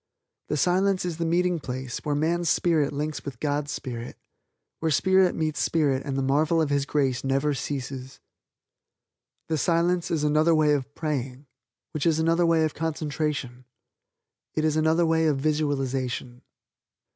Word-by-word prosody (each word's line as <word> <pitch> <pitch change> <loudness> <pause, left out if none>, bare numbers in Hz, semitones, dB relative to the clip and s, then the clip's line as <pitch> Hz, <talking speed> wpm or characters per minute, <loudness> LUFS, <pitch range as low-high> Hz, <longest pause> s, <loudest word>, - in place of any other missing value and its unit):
The 150 - -1
Silence 185 +4 +2
is 170 -3 -3
the 165 - -1
meeting 175 +1 +1
place 130 -2 -5
where 145 -1 -2
man's 165 +3 0
spirit 155 -4 +2
links 150 +1 -3
with 135 -5 -7
God's 145 -1 -1
spirit; 120 -2 -6 0.6
where 160 - 0
spirit 190 +4 +3
meets 155 -2 -1
spirit 145 -5 +1
and 135 -2 -3
the 135 - 0
marvel 150 +5 +2
of 155 -3 +1
His 140 0 +1
grace 135 -4 0
never 135 +2 +1
ceases. 135 -2 -5 1.3
The 160 -2 -1
Silence 175 +2 +1
is 160 -3 0
another 155 +2 +3
way 155 -1 +4
of 140 0 -3
praying, 135 -3 -3 0.5
which 155 +1 -1
is 160 -2 +3
another 165 +2 +2
way 165 -1 +3
of 155 - 0
concentration. 150 -5 -3 0.9
It 155 - +1
is 155 -1 +1
another 160 +2 +3
way 160 0 +2
of 150 -3 +2
visualization. 135 -4 -2
150 Hz, 155 wpm, -26 LUFS, 135-165 Hz, 1.3 s, way